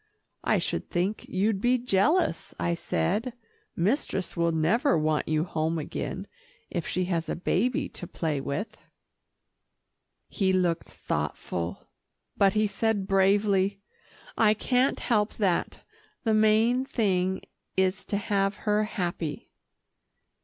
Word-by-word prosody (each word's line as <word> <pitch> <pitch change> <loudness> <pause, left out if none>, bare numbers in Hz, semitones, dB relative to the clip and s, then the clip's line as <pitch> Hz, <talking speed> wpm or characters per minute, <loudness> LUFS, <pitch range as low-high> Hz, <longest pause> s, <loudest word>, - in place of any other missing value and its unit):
"I - - +3
should - - -2
think 185 +4 -1
you'd 195 +1 +1
be 245 +2 +3
jealous," 250 - +1
I 170 - +1
said. 205 - -1 0.4
"Mistress 190 - 0
will 170 0 +2
never 205 - +2
want 155 -1 0
you 155 0 +1
home 165 -1 -1
again, 170 +5 -4 0.5
if 170 -3 -3
she 185 0 0
has 170 -2 -1
a - - -1
baby 215 +7 0
to 175 - -7
play 155 -5 -2
with." 145 +11 -4 1.5
He 190 -2 +1
looked 175 -3 +1
thoughtful, 85 +3 -4 0.5
but 195 -1 +4
he 215 0 +3
said 210 -1 0
bravely, 195 0 +3 0.6
"I 215 -1 +4
can't 250 +4 +1
help 215 -3 +1
that. 190 -5 0 0.4
The 225 -3 +2
main 220 +4 +4
thing 190 -7 0 0.3
is 190 0 +1
to 200 - -1
have 195 0 0
her 210 0 +2
happy." 175 -7 -4
195 Hz, 125 wpm, -27 LUFS, 170-215 Hz, 1.5 s, but